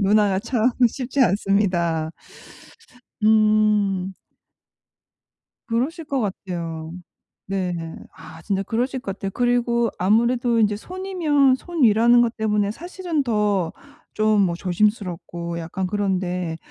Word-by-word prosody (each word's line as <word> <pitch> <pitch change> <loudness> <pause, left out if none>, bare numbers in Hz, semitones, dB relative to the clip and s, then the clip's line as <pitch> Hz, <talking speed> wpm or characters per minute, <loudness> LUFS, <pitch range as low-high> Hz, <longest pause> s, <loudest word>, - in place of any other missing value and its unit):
누나가 200 -1 +3
참 235 +2 +1 0.2
쉽지 260 +1 -3
않습니다. 185 -7 +1 1.1
음. 210 -3 +3 1.5
그러실 280 +9 -2
것 280 -2 -1
같아요. 170 -5 -5 0.6
네. 190 -2 -2 0.4
아, 160 - -12
진짜 195 -1 -1
그러실 250 +6 -2
것 195 -6 -5
같아요. 195 -1 -4
그리고 240 -1 +1
아무래도 235 +4 +2
인제 210 -1 +2
손위면 325 - +1
손위라는 240 - +4
것 235 0 0
때문에 210 -2 +1
사실은 345 - -3
더 210 -7 0 0.4
좀 215 -1 +3
뭐 175 -3 +1
조심스럽고 175 -3 -2
약간 170 +3 -3
그런데. 180 -4 -2
210 Hz, 235 characters per minute, -22 LUFS, 190-240 Hz, 1.5 s, 손위라는